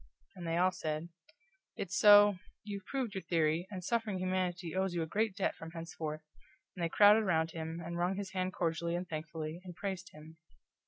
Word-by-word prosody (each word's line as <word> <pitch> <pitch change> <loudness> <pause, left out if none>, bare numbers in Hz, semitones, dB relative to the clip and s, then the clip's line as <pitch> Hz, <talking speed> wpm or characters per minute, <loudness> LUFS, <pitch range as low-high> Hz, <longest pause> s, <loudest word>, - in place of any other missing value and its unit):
And 175 -2 -7
they 165 0 0
all 185 +1 +4
said: 160 -2 -4 0.7
"It's 190 -1 -4
so 205 -1 +8 0.3
you've 200 -2 -6
proved 260 -6 -2
your 190 - -3
theory, 165 0 +1
and 185 -3 -6
suffering 225 -1 0
humanity 180 -2 -1
owes 190 -1 0
you 170 - 0
a - - -2
great 210 +4 0
debt 200 - 0
from 165 - -8
henceforth," 165 -2 -6 0.5
and 175 - -4
they 165 - +1
crowded 205 +4 +7
around 165 -5 +1
him, 160 0 -5
and 170 +1 -4
wrung 180 +2 +1
his 200 0 -5
hand 185 -1 -1
cordially 170 -2 -1
and 180 +1 -3
thankfully, 155 0 -5
and 180 -2 -9
praised 190 -1 -4
him. 155 +1 -13
175 Hz, 195 wpm, -33 LUFS, 165-190 Hz, 0.7 s, so